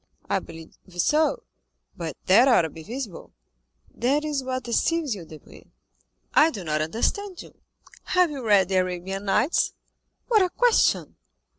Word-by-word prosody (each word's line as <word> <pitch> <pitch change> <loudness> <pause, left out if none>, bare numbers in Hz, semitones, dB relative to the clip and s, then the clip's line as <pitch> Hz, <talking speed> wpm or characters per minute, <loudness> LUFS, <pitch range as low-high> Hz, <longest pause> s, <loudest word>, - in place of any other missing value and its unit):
"I - - +1
believe 165 -1 -12 0.2
so." 310 - +2 0.5
"But 165 -4 -6
that 225 +8 +6
ought 245 -9 +5
to 160 - -3
be 160 - -11
visible." 220 - -7 0.6
"That 280 +6 0
is 290 -3 -2
what 255 0 -3
deceives 295 +4 0
you, 185 -5 -8
Debray." 155 -1 -14 0.7
"I 310 - +6
do 210 - -7
not 155 -2 -1
understand 345 - -2
you." - - -16 0.5
"Have 360 -3 +2
you 275 -3 -6
read 200 -4 +4
the 190 - +1
Arabian 185 +2 -2
Nights?" 255 - +1 0.5
"What 445 -4 +4
a 370 - +2
question!" 485 +5 +2
235 Hz, 150 wpm, -25 LUFS, 180-305 Hz, 0.7 s, that